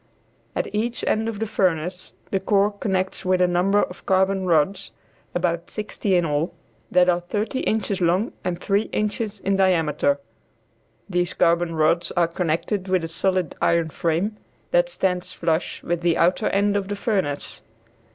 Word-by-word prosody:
At -, -, -1 dB
each 230 Hz, +3 st, -1 dB
end 220 Hz, +1 st, +1 dB
of 220 Hz, -, -5 dB
the 225 Hz, -, -1 dB
furnace 180 Hz, -3 st, -1 dB, 0.2 s
the 195 Hz, -, +1 dB
core 200 Hz, +1 st, +2 dB
connects 190 Hz, -2 st, -2 dB
with 185 Hz, 0 st, +2 dB
a 180 Hz, -, +5 dB
number 180 Hz, +3 st, +2 dB
of 180 Hz, -, -7 dB
carbon 190 Hz, 0 st, +2 dB
rods 180 Hz, +4 st, +1 dB, 0.4 s
about 175 Hz, -1 st, -1 dB
sixty 210 Hz, -2 st, -2 dB
in 175 Hz, -1 st, +3 dB
all 150 Hz, +3 st, -1 dB, 0.3 s
that 180 Hz, 0 st, +4 dB
are 175 Hz, -1 st, +3 dB
thirty 210 Hz, +8 st, -2 dB
inches 210 Hz, -3 st, -1 dB
long 180 Hz, +7 st, +1 dB
and 175 Hz, -1 st, -2 dB
three 200 Hz, +1 st, 0 dB
inches 210 Hz, 0 st, -2 dB
in 195 Hz, 0 st, +1 dB
diameter. 160 Hz, -6 st, +2 dB, 0.9 s
These 175 Hz, -1 st, -1 dB
carbon 170 Hz, 0 st, +2 dB
rods 160 Hz, +2 st, +2 dB
are 175 Hz, -2 st, +3 dB
connected 180 Hz, +3 st, -1 dB
with 185 Hz, -2 st, +1 dB
a -, -, -2 dB
solid 185 Hz, 0 st, 0 dB
iron 170 Hz, -2 st, +2 dB
frame 175 Hz, +8 st, -1 dB, 0.3 s
that -, -, +3 dB
stands 180 Hz, -, -1 dB
flush 165 Hz, 0 st, -1 dB
with 175 Hz, 0 st, -1 dB
the 170 Hz, -1 st, +2 dB
outer 175 Hz, +2 st, +2 dB
end 200 Hz, +1 st, +2 dB
of 200 Hz, -1 st, -1 dB
the 205 Hz, -, -3 dB
furnace. 190 Hz, -9 st, -2 dB
185 Hz, 160 wpm, -23 LUFS, 170-200 Hz, 0.9 s, a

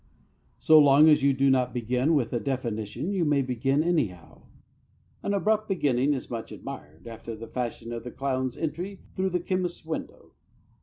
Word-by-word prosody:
So 155 Hz, -1 st, +6 dB
long 145 Hz, +1 st, +7 dB
as 150 Hz, -1 st, +5 dB
you 140 Hz, 0 st, +4 dB
do 135 Hz, 0 st, +3 dB
not 130 Hz, -1 st, +1 dB
begin 125 Hz, +6 st, +1 dB
with 125 Hz, -5 st, 0 dB
a 120 Hz, -, +1 dB
definition 120 Hz, -, -3 dB
you 190 Hz, -4 st, 0 dB
may 145 Hz, -3 st, +2 dB
begin 135 Hz, +4 st, 0 dB
anyhow. 115 Hz, -, -2 dB, 0.7 s
An 200 Hz, -, -2 dB
abrupt 215 Hz, +2 st, +1 dB
beginning 145 Hz, -6 st, +2 dB
is 130 Hz, -, -6 dB
much 115 Hz, -2 st, -5 dB
admired, 75 Hz, +3 st, -9 dB
after 115 Hz, 0 st, -7 dB
the 115 Hz, +1 st, -8 dB
fashion 120 Hz, -1 st, -4 dB
of 115 Hz, -1 st, -5 dB
the 125 Hz, -, -6 dB
clown's 130 Hz, -1 st, -2 dB
entry 175 Hz, +6 st, -4 dB
through 190 Hz, 0 st, 0 dB
the 180 Hz, -1 st, 0 dB
chemist's 180 Hz, -1 st, -3 dB
window. 160 Hz, 0 st, -6 dB
135 Hz, 170 wpm, -27 LUFS, 120-160 Hz, 0.7 s, long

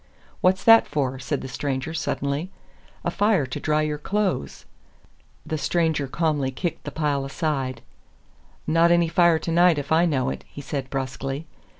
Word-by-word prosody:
"What's 185 Hz, +1 st, +3 dB
that 225 Hz, 0 st, +7 dB
for?" 135 Hz, -3 st, -2 dB
said 140 Hz, +1 st, -3 dB
the -, -, -6 dB
stranger, 135 Hz, +2 st, -3 dB
suddenly. 145 Hz, +1 st, -2 dB, 0.6 s
"A -, -, +1 dB
fire 205 Hz, -8 st, +2 dB
to 130 Hz, -, -5 dB
dry 155 Hz, 0 st, +1 dB
your 150 Hz, -1 st, -2 dB
clothes." 190 Hz, -, -2 dB, 0.8 s
The 155 Hz, -, -3 dB
stranger 160 Hz, -4 st, 0 dB
calmly 150 Hz, -2 st, 0 dB
kicked 165 Hz, +6 st, -4 dB
the 145 Hz, -, -4 dB
pile 145 Hz, -2 st, -1 dB
aside. 135 Hz, -4 st, -2 dB, 0.8 s
"Not 165 Hz, +2 st, +4 dB
any 170 Hz, -1 st, +3 dB
fire 170 Hz, -1 st, +4 dB
tonight 170 Hz, +1 st, +3 dB
if 145 Hz, +1 st, -5 dB
I 165 Hz, +2 st, +4 dB
know 135 Hz, -4 st, 0 dB
it," -, -, -7 dB
he -, -, -11 dB
said, 140 Hz, -1 st, -4 dB
brusquely. 135 Hz, +2 st, -4 dB
150 Hz, 160 wpm, -24 LUFS, 135-170 Hz, 0.8 s, that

